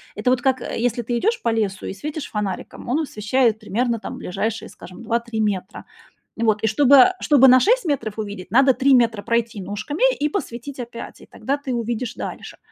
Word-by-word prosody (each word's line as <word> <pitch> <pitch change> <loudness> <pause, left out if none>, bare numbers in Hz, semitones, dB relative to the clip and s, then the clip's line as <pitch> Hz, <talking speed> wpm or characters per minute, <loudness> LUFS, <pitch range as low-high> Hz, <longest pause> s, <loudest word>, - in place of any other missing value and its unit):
Это 215 +4 0
вот 255 -1 +2
как, 260 -1 +1
э, - - -5
если 240 0 0
ты 240 +1 -2
идешь 455 - 0
по - - 0
лесу 210 -4 -1
и - - -4
светишь 300 +7 -6
фонариком, 205 +1 -5
он 270 +6 +1
освещает 230 -3 0
примерно 230 +2 -1
там - - -7
ближайшие, 195 +4 -3
скажем, 185 - -12
2, 235 +1 0
3 235 -1 -6
метра. 195 -3 -3 0.5
И 230 - -2
вот, 215 -1 +1
и 220 - +3
чтобы 275 - +6
чтобы 270 -3 +5
на 255 0 +7
6 485 - +2
метров 230 -9 -2
увидеть, 205 -3 -6
надо 265 +3 +5
3 265 +2 +3
метра 225 -4 +2
пройти 230 -1 -1
ножками 205 - -5 0.2
и 295 +1 +1
посветить 270 - -5
опять, 235 -1 -8
и - - -15
тогда 275 +2 -3
ты 275 -3 -5
увидишь 235 +1 -3
дальше. - - -7
235 Hz, 205 wpm, -21 LUFS, 215-265 Hz, 0.5 s, на